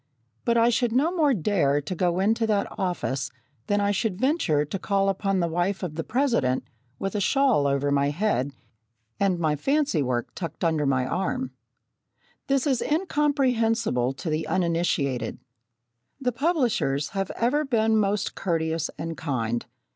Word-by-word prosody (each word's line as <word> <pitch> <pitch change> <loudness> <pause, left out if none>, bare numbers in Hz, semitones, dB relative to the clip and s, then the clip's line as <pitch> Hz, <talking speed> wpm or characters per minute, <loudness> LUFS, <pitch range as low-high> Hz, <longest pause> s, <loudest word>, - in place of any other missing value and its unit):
But 235 0 +3
I 230 +1 +5
should 240 -1 +1
no 285 +7 +3
more 305 -5 +3
dare 160 -6 +2
to 145 +5 -5
go 175 0 0
into 225 +3 +2
that 205 -2 +2
office 140 -9 -2 0.4
than 205 0 +2
I 200 0 +2
should 205 -1 -1
venture 210 - +2
to 170 +6 -4
call 195 +1 +1
upon 195 0 0
the 170 - +1
wife 175 +4 -1
of 175 -4 -3
the 165 +1 -3
President 230 - +1 0.3
with 195 +6 -3
a 205 - -1
shawl 260 - +3
over 140 +1 +1
my 140 0 +2
head, 145 -5 0 0.7
and 195 -3 +2
my 155 -3 +1
fancywork 150 - 0
tucked 165 -2 -6
under 160 -4 +1
my 130 -2 +2
arm. 195 - -2 1.0
This 275 0 +2
is 265 -5 +1
incomprehensible 250 - +1
to 155 +4 -5
the 155 +1 -1
uninitiated. 165 -9 0 0.8
The 250 -2 0
publishers 240 - 0
have 195 -2 -2
ever 260 +6 +1
been 225 -5 +2
most 205 -1 +1
courteous 165 -3 -1
and 165 0 -4
kind. 120 -6 -2
195 Hz, 155 wpm, -25 LUFS, 150-235 Hz, 1.0 s, I